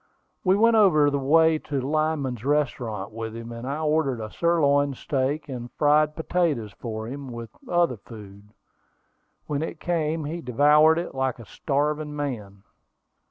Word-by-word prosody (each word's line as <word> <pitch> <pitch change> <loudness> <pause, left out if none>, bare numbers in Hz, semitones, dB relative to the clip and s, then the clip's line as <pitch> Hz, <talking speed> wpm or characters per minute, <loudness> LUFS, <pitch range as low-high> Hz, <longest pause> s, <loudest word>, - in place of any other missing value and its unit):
We 185 0 +4
went 230 +2 +4
over 155 -9 +5
the 140 - 0
way 160 +3 +4
to 145 -2 -3
Lyman's 140 -4 -1
restaurant 125 -8 -1
with 110 0 -6
him, 115 0 -7
and 115 +2 -7
I 140 +2 -2
ordered 150 -5 +1
a 110 -1 -6
sirloin 145 -5 +2
steak 140 +3 -2
and 120 -3 -7
fried 150 0 +3
potatoes 160 - -1
for 110 0 -6
him, 135 +1 -7
with 115 -1 -8 0.2
other 175 -8 +2
food. 105 -1 -13 1.0
When 145 -1 -2
it 160 0 -5
came, 160 -2 -1
he 165 +4 -4
devoured 150 +5 +4
it 175 - -4
like 130 -1 -1
a 115 - -11
starving 150 +5 -2
man. 105 -9 -5
145 Hz, 155 wpm, -25 LUFS, 120-155 Hz, 1.0 s, over